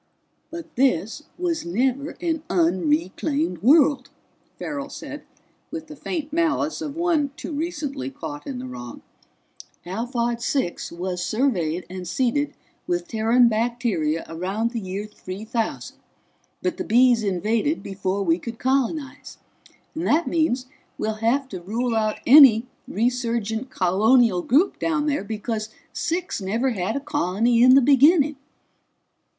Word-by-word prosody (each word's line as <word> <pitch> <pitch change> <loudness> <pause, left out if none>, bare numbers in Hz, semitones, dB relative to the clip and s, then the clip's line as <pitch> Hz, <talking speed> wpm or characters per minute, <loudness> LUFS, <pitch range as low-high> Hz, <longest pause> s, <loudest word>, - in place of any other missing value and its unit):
"But 335 0 -9
this 250 - +1
was 345 -2 -1
never 260 - -1
an 325 -3 -1
unreclaimed 180 - 0
world," 275 - +4 0.5
Farrell 285 -1 -5
said - - -8 0.5
with 320 -1 -6
the 305 -1 -11
faint 305 0 -5
malice 320 -1 0
of 300 -2 -5
one 335 -4 +1
too - - -6
recently 290 - -3
caught 145 +1 -8
in 135 - -4
the 125 - -6
wrong. 120 -1 -8 0.8
"Alphard 235 +4 -2
Six 245 -8 -2
was 180 +1 -4
surveyed 180 - 0
and 185 -1 -7
seeded 265 +7 0 0.3
with 175 0 -1
Terran 230 +2 +3
bacteria 220 -9 0
around 190 +8 -2
the 235 - -3
year 195 +1 -5
3000, 215 +2 -5 0.7
but 360 -3 -1
the - - -3
Bees 240 +1 +4
invaded 215 - 0
before 195 0 -2
we 165 -1 +2
could 230 +4 -7
colonize. 275 +3 -2 0.6
And 320 +2 -3
that 320 +4 +3
means 310 -6 +1 0.3
we'll 215 0 -3
have 260 +5 +1
to 185 -3 -7
rule 230 +6 -2
out 215 -1 0
any 255 -4 +8 0.2
resurgent 235 0 -1
colonial 205 +1 +3
group 300 - +2
down 320 -3 0
there, 290 -7 0
because 215 +1 -4 0.2
Six 345 - -2
never 225 +7 0
had 200 0 -2
a - - 0
colony 235 - +1
in 255 +1 +8
the 275 - +7
beginning." 290 +3 +5
235 Hz, 135 wpm, -23 LUFS, 190-285 Hz, 0.8 s, any